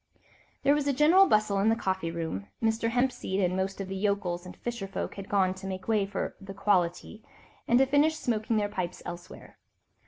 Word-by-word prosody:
There 280 - +5
was 290 -1 +1
general 330 +8 +6
bustle 215 -2 +2
in 205 +3 +3
the 225 - +3
coffee 190 -6 -2
room: 160 - -4
Mr. 225 0 +1
Hempseed 245 -5 0
and 180 -2 +1
most 190 +1 -2
of 195 - -4
the 195 - -5
yokels 190 -3 -1
and 180 - -11
fisher 235 -5 -4
folk 195 - -4
had 195 -1 -9
gone 190 -2 +2
to 190 +1 -8
make 185 -1 -6
way 215 -3 +2
for 200 - -4
"the 195 0 -9
quality," 190 +1 0 0.5
and 240 - +4
to 270 - +5
finish 290 +4 +3
smoking 225 -6 -1
their 205 -1 +1
pipes 180 -3 -4
elsewhere. 175 0 -9
200 Hz, 195 wpm, -28 LUFS, 185-230 Hz, 0.5 s, general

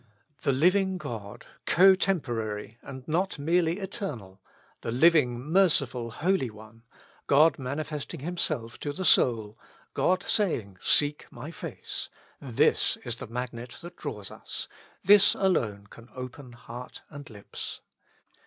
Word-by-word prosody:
The - - +2
living 185 +7 +3
God, 105 - -7 0.2
cotemporary 125 - +2
and 130 -1 -10
not 175 +4 0
merely 165 +3 +1
eternal,^ 140 - -6 0.4
the - - -4
living, 130 -2 +4
merciful 140 -6 +2
Holy 165 +2 0
One, 110 +1 -14 0.5
God 150 +2 +5
manifesting 145 +3 -4
Himself 140 -8 -2
to 145 - -4
the 185 +4 -4
soul, 110 -7 +3 0.3
God 185 0 +1
saying, 110 - 0
" - - -29
Seek 145 0 +2
my - - -8
face; - - -5 0.2
" - - -34
this 125 -5 +2
is - - -3
the - - -7
magnet 120 0 -6
that 175 +1 -9
draws 105 -10 -6
us, - - -6 0.4
this 205 +1 +6
alone 110 - 0
can 115 +3 -15
open 125 0 -8
heart 120 +1 -10
and 145 -1 -10
lips. 105 -3 -7
135 Hz, 130 wpm, -28 LUFS, 115-175 Hz, 0.5 s, this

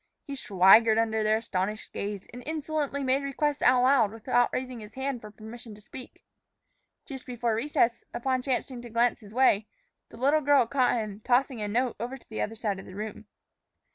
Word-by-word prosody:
He 280 - -6
swaggered 215 0 +5
under 220 -1 +1
their 215 0 +3
astonished 210 -1 -3
gaze, 200 -1 -4
and 245 - -8
insolently 305 -2 -2
made 265 +1 +2
requests 285 +1 -1
aloud 250 -3 +4
without 245 +2 +1
raising 255 -2 -4
his 215 0 -12
hand 265 -2 -3
for 215 - -10
permission 220 +1 -11
to - - -15
speak. 255 +4 -11 0.8
Just 265 -4 -8
before 240 -2 -1
recess, 235 -1 +1
upon 255 +1 -1
chancing 255 -1 -2
to 240 - -10
glance 235 +2 +1
his 205 -3 -14
way, 220 -4 +3 0.4
the - - -13
little 285 +5 +3
girl 285 -3 +4
caught 250 +1 +2
him 215 -3 -4
tossing 250 +1 +1
a 210 - -2
note 240 +3 0
over 245 +4 -4
to - - -21
the 220 - -4
other 225 - -3
side 210 -4 -2
of - - -11
the 185 - -11
room. 215 +1 -7
240 Hz, 190 wpm, -28 LUFS, 215-265 Hz, 0.8 s, swaggered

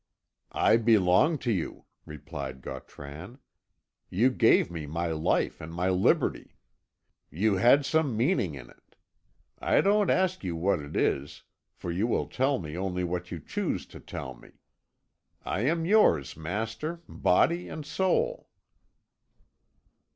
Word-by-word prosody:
"I 110 - +4
belong 115 - +4
to 120 - +2
you," 90 -6 -3 0.2
replied 70 -3 -7
Gautran. 75 - -9 0.7
"You 120 +8 +3
gave 115 -7 +3
me 80 -3 -6
my 85 +2 -2
life 80 0 0
and 80 +1 -8
my 90 +3 -1
liberty. 95 0 +1 0.7
You 100 +5 +1
had 130 +7 +5
some 145 -6 +1
meaning 115 - +1
in 70 - -11
it. - - -26 0.6
I - - +2
don't 205 -1 +3
ask 185 - +1
you 90 -3 -3
what 90 +2 +1
it 75 +1 -9
is, 70 +1 -1 0.3
for 85 - -5
you 95 +7 0
will 120 - 0
tell 135 +2 0
me 75 -5 -7
only 90 0 -2
what 90 0 -3
you 85 - -5
choose - - -3
to - - -9
tell 65 - -7
me. - - -18 0.9
I 105 - -1
am 165 +1 +1
yours, 170 - +3
master, 110 - -4
body 170 - +1
and 155 - -7
soul." 195 - 0
95 Hz, 135 wpm, -28 LUFS, -, 0.9 s, had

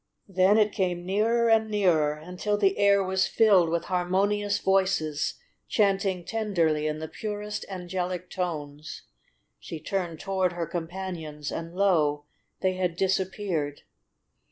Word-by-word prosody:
Then 190 +2 +4
it 215 -1 +3
came 180 -4 -1
nearer 225 +5 +2
and 220 -1 +3
nearer 175 -8 +2
until 180 +7 -3
the 390 - +2
air 200 -1 +5
was 190 0 +1
filled 195 -7 +4
with 170 0 -1
harmonious 200 +3 +1
voices 185 -6 +1 0.3
chanting 195 -4 +1
tenderly 170 -9 0
in 155 0 -2
the 160 0 -5
purest 210 +3 -5
angelic 180 -1 -4
tones. 155 -5 -5 0.6
She 160 - -7
turned 170 -1 -3
toward 190 -2 0
her 175 -1 -2
companions 165 -3 -5
and 165 +1 -6
lo! 155 -7 +2 0.4
they 185 0 +2
had 180 -2 -1
disappeared. 190 -5 -1
185 Hz, 130 wpm, -27 LUFS, 165-200 Hz, 0.6 s, air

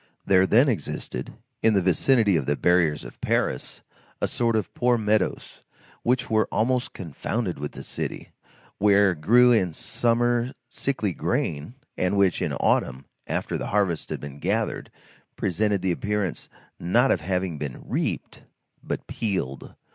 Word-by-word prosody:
There 95 0 +4
then 120 +9 +5
existed, 75 - -3 0.3
in 110 -1 +4
the 100 - +4
vicinity 100 - +3
of 75 -5 0
the 75 - +2
barriers 85 -3 +2
of - - -12
Paris, - - -1 0.4
a - - 0
sort 115 -1 0
of 110 - -2
poor 125 -1 +2
meadows, 105 -3 -1 0.4
which 125 +1 +1
were 110 -1 +2
almost 125 +3 0
confounded 90 - -3
with 75 0 -5
the - - -8
city, - - -5 0.5
where 100 -1 +5
grew 120 +10 +5
in 95 -8 +2
summer 120 +6 0 0.2
sickly 110 -9 -1
grain, 75 - -2 0.2
and 90 +2 +1
which, 95 -3 +3
in - - 0
autumn, 65 +2 0 0.2
after - - -2
the - - -4
harvest 100 -5 0
had - - -3
been 70 0 -8
gathered, - - -1 0.5
presented 100 +1 0
the 95 - +1
appearance, 100 0 -2 0.3
not 120 +10 +3
of 85 - +1
having 90 -2 -2
been 70 -4 -6
reaped, - - -3 0.4
but - - -4
peeled. 90 - -3
100 Hz, 145 wpm, -25 LUFS, 85-115 Hz, 0.5 s, then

